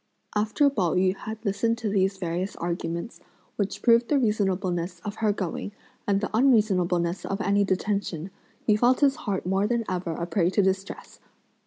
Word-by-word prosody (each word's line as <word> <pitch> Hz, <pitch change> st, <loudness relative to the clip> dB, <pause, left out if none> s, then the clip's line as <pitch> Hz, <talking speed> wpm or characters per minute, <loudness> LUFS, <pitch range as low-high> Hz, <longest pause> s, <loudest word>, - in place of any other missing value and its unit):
After 215 Hz, +7 st, +2 dB
Pao 185 Hz, -10 st, 0 dB
yü 185 Hz, +1 st, +2 dB
had 220 Hz, +3 st, -8 dB
listened 230 Hz, +3 st, +1 dB
to 230 Hz, -2 st, -3 dB
these 195 Hz, -1 st, +1 dB
various 180 Hz, +2 st, -3 dB
arguments, 170 Hz, +4 st, -4 dB, 0.4 s
which 200 Hz, 0 st, -3 dB
proved 235 Hz, 0 st, +5 dB
the 295 Hz, -, +3 dB
reasonableness 190 Hz, -6 st, 0 dB
of 205 Hz, +3 st, -6 dB
her 215 Hz, -2 st, +2 dB
going 200 Hz, +1 st, -4 dB, 0.3 s
and 200 Hz, -1 st, +2 dB
the 210 Hz, 0 st, -3 dB
unreasonableness 190 Hz, -8 st, +2 dB
of 195 Hz, -, -3 dB
any 200 Hz, 0 st, +2 dB
detention, 190 Hz, -3 st, -2 dB, 0.3 s
he 215 Hz, -, +4 dB
felt 245 Hz, +5 st, +3 dB
his 275 Hz, -1 st, +4 dB
heart 190 Hz, -3 st, -1 dB
more 190 Hz, +3 st, +1 dB
than 235 Hz, -1 st, 0 dB
ever 180 Hz, -2 st, -2 dB
a 170 Hz, -, -3 dB
prey 170 Hz, 0 st, +1 dB
to 205 Hz, -, +2 dB
distress. 190 Hz, +1 st, -3 dB
195 Hz, 170 wpm, -26 LUFS, 180-215 Hz, 0.4 s, proved